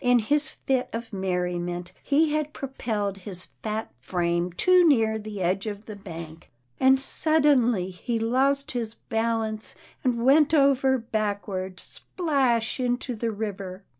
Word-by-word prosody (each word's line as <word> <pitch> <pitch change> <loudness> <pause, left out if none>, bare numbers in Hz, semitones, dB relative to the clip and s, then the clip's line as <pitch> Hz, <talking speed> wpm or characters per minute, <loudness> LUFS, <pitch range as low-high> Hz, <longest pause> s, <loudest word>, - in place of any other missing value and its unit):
In 245 0 +5
his 290 +7 +2
fit 260 -2 -1
of 230 -1 -5
merriment, 180 -2 -2
he 300 +2 +2
had 305 -1 -1
propelled 215 -7 -3
his 185 -1 -8
fat 220 +1 -3
frame 175 +3 0
too 365 - +4
near 220 -6 +3
the 210 -2 -6
edge 190 +4 0
of 205 0 -5
the 215 - -7
bank, 165 -4 -9 0.3
and 265 0 +5
suddenly 270 - +2
he 230 +6 -3
lost 265 +5 +1
his 230 -3 -3
balance, 225 -1 -2 0.3
and 240 -2 0
went 295 +3 +5
over 275 -2 +4
backward, 205 -5 -3
splash 265 -10 -1
into 250 0 -1
the 230 0 -2
river. 200 -3 -5
225 Hz, 135 wpm, -26 LUFS, 195-265 Hz, 0.3 s, In